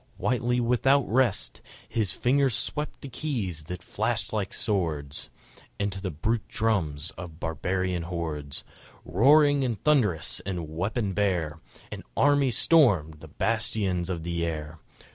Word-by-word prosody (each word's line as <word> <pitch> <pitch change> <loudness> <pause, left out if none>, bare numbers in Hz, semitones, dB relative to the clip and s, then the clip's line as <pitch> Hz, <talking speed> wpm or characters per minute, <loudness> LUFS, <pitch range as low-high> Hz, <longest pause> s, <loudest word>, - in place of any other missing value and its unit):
Whitely 120 0 +1
without 125 +3 +3
rest, 120 -3 +1 0.3
His 110 -6 0
fingers 135 +2 +2
swept 150 0 -3
the - - -7
keys 115 - -3
that 90 +2 -6
flashed - - -2
like - - -1
swords,... 80 -8 -2 0.5
And 100 0 0
to 95 0 -6
the 95 - -2
brute 105 +8 -1
drums 85 -9 0
of 85 -3 -8
barbarian 90 +2 -1
hordes, 80 -5 -4 0.4
Roaring 145 - +5
and 120 -5 -1
thunderous 110 - +2
and 90 -4 -4
weapon 95 +6 -2
bare, 90 -6 0 0.3
An - - -6 0.2
army 145 -1 +4
stormed 100 - +4
the 80 - -11
bastions 95 -1 -1
of 85 -3 -3
the 85 0 -2
air! 80 -1 -4
95 Hz, 135 wpm, -27 LUFS, 80-120 Hz, 0.5 s, Roaring